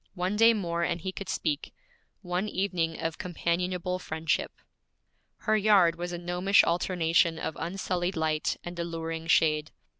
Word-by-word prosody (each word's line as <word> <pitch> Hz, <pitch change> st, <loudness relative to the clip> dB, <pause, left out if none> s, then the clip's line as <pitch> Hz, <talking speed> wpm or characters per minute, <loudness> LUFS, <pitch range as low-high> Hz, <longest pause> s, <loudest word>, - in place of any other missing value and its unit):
One 180 Hz, +2 st, -1 dB
day 225 Hz, +2 st, +6 dB
more 170 Hz, -4 st, -2 dB
and 170 Hz, -, 0 dB
he 185 Hz, +3 st, -4 dB
could 195 Hz, +1 st, -7 dB
speak 150 Hz, -3 st, -2 dB, 0.5 s
one 180 Hz, +3 st, -2 dB
evening 180 Hz, -5 st, -1 dB
of 165 Hz, -2 st, -3 dB
companionable 180 Hz, 0 st, -1 dB
friendship. 160 Hz, -2 st, -1 dB, 0.9 s
Her 215 Hz, -, +2 dB
yard 200 Hz, -5 st, +5 dB
was 175 Hz, +1 st, -5 dB
a 175 Hz, -, -4 dB
gnomish 180 Hz, +3 st, +3 dB
alternation 170 Hz, -1 st, +2 dB
of 160 Hz, -, -4 dB
unsullied 180 Hz, +1 st, -2 dB
light 155 Hz, -1 st, 0 dB
and 175 Hz, 0 st, -7 dB
alluring 165 Hz, -1 st, -4 dB
shade. 155 Hz, -2 st, +3 dB
175 Hz, 145 wpm, -28 LUFS, 165-185 Hz, 0.9 s, day